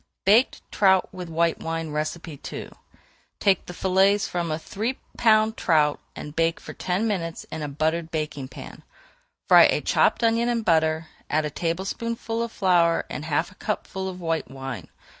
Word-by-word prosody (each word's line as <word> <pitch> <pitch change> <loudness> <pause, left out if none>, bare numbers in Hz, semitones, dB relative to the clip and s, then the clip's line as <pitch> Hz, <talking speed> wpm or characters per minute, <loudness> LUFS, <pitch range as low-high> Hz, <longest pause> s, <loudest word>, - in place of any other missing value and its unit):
BAKED 220 +7 +4
TROUT 190 -2 +3
WITH 180 -2 -7
WHITE 165 0 +1
WINE 165 -2 -4
II 155 0 -5 0.7
Take 195 -2 +2
the 180 - -7
fillets 195 +3 +3
from 175 -1 -2
a 155 - -1
three 220 +10 -3 0.2
pound 220 -1 +3
trout 150 -4 +2 0.2
and 150 0 -8
bake 165 0 +1
for - - -9
ten 185 +5 -1
minutes 165 -6 -3
in 160 - -5
a 150 - -2
buttered 160 +3 -1
baking 150 -4 -3
pan. - - -10 0.7
Fry - - +9
a - - +2
chopped - - +2
onion 230 +1 +3
in 235 -2 0
butter, 160 -3 +2 0.2
add 155 0 +1
a 150 - -3
tablespoonful 225 +8 -3
of 235 -1 -3
flour 175 -5 +3
and 150 - -5
half 160 +3 0
a - - -18
cupful 190 -2 -3
of 185 -1 -8
white 165 -2 -2
wine. 135 -2 -6
170 Hz, 165 wpm, -25 LUFS, 160-200 Hz, 0.7 s, Fry